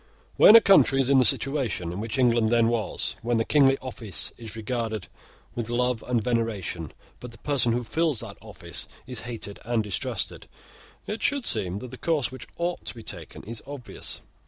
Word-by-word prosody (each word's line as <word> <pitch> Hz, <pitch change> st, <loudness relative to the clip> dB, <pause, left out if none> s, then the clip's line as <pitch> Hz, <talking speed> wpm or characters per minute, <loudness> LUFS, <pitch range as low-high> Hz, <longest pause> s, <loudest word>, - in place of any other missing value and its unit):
When 215 Hz, -, +8 dB
a 230 Hz, -, +10 dB
country 190 Hz, -10 st, +5 dB
is 135 Hz, 0 st, +2 dB
in 135 Hz, -, +6 dB
the -, -, +5 dB
situation 120 Hz, -, +3 dB
in 90 Hz, -, -5 dB
which 110 Hz, +2 st, -3 dB
England 120 Hz, -3 st, +3 dB
then 115 Hz, -1 st, +3 dB
was, 115 Hz, -2 st, -1 dB
when 120 Hz, 0 st, 0 dB
the 115 Hz, -, +1 dB
kingly 135 Hz, -2 st, +4 dB
office 115 Hz, -6 st, -2 dB
is 115 Hz, -1 st, -9 dB
regarded 110 Hz, -2 st, -3 dB, 0.5 s
with 115 Hz, -1 st, -4 dB
love 125 Hz, -1 st, 0 dB
and 120 Hz, -3 st, +1 dB
veneration, 105 Hz, -, -2 dB, 0.3 s
but 125 Hz, -, -9 dB
the 115 Hz, -, -14 dB
person 130 Hz, -2 st, +1 dB
who 120 Hz, +1 st, 0 dB
fills 155 Hz, +1 st, 0 dB
that -, -, -9 dB
office -, -, -5 dB, 0.2 s
is 125 Hz, -3 st, -4 dB
hated 110 Hz, -4 st, -5 dB
and 115 Hz, -1 st, 0 dB
distrusted, 105 Hz, -3 st, -3 dB, 0.6 s
it 210 Hz, +2 st, -5 dB
should 285 Hz, -3 st, +1 dB
seem 95 Hz, -4 st, -1 dB
that 120 Hz, +3 st, -8 dB
the 130 Hz, -, -10 dB
course 150 Hz, -7 st, 0 dB
which 130 Hz, -, -9 dB
ought 175 Hz, +1 st, -2 dB
to -, -, -5 dB
be 115 Hz, -, -10 dB
taken -, -, -6 dB
is 115 Hz, +1 st, -6 dB
obvious. 140 Hz, -4 st, -6 dB
120 Hz, 190 wpm, -26 LUFS, 110-135 Hz, 0.6 s, a